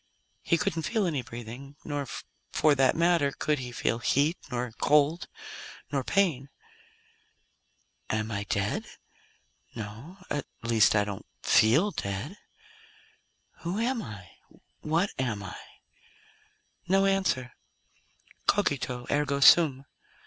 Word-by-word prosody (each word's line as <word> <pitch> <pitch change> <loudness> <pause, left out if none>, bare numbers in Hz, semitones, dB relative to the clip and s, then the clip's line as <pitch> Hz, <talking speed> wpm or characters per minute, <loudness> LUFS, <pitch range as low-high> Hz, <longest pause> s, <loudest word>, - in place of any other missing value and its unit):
He 170 - +2
couldn't 165 0 -1
feel 215 +4 0
any 150 -7 0
breathing. 120 +3 -9
Nor, 145 -2 -3 0.4
for 155 - +4
that 135 -2 +3
matter, 170 -4 +3
could 150 +1 -1
he 125 -1 -6
feel 115 -1 -1
heat, 145 +7 +2
nor 125 -1 -3
cold, 150 +3 +3 0.6
nor 140 -2 0
pain. 155 -7 +1 1.6
"Am 110 0 -1
I 100 -1 -3
dead? 100 0 -1 0.9
No. 115 - -8
At 145 -2 -3 0.2
least, 115 -2 +4
I 105 - +4
don't 100 -1 -6 0.2
feel 150 - +4
dead. 100 - -4 1.2
Who 175 +4 -3
am 235 +1 0
I? 105 -4 -9 0.5
What 165 +6 0
am 115 -6 -1
I?" 100 - -7 1.3
No 195 +2 +4
answer. 190 -11 +1 0.9
_Cogito, 130 -10 +1
ergo 145 -1 +1
sum. 140 -2 +6
140 Hz, 115 wpm, -28 LUFS, 115-165 Hz, 1.6 s, sum